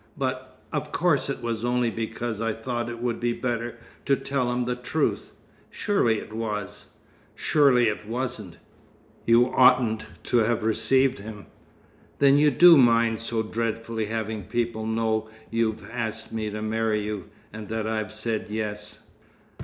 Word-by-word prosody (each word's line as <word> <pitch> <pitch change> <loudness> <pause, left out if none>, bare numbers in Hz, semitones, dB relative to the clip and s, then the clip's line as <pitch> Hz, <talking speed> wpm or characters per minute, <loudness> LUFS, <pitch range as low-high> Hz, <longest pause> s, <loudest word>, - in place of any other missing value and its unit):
But - - -4
of - - -3
course - - +1
it - - -4
was 115 -1 -2
only 120 -1 +1
because 115 0 -4
I 115 -1 0
thought 120 +1 -3
it 120 0 -7
would 120 -2 -1
be 120 0 0
better 120 -1 -3 0.3
to 140 - +5
tell 130 -3 -1
him 125 0 -1
the 125 0 -1
truth. 125 +6 -1 0.4
Surely 160 - +1
it 110 - -8
was?" 105 -3 -5 0.4
"Surely 135 -6 +4
it 105 0 -3
wasn't. 115 -7 -4 0.7
You 115 +1 +6
oughtn't 115 -4 +4 0.2
to 120 - +1
have 115 0 +2
received 130 +4 +2
him." 105 0 -9 0.7
"Then 140 0 +5 0.2
do 175 0 +9
you 165 - +9
mind 115 -3 +4
so 115 -1 -1
dreadfully 115 0 -2
having 110 -2 -3
people 115 0 -2
know 110 -1 0 0.2
you've 115 -1 -1
asked 110 -2 -4
me 110 -1 -2
to 105 +1 -5
marry 110 -1 0
you, 105 -3 -4 0.3
and 110 -1 -7
that 110 -1 -2
I've 110 -2 -2
said 110 0 -3
'yes'?" 105 0 -4
115 Hz, 155 wpm, -25 LUFS, 110-120 Hz, 0.7 s, do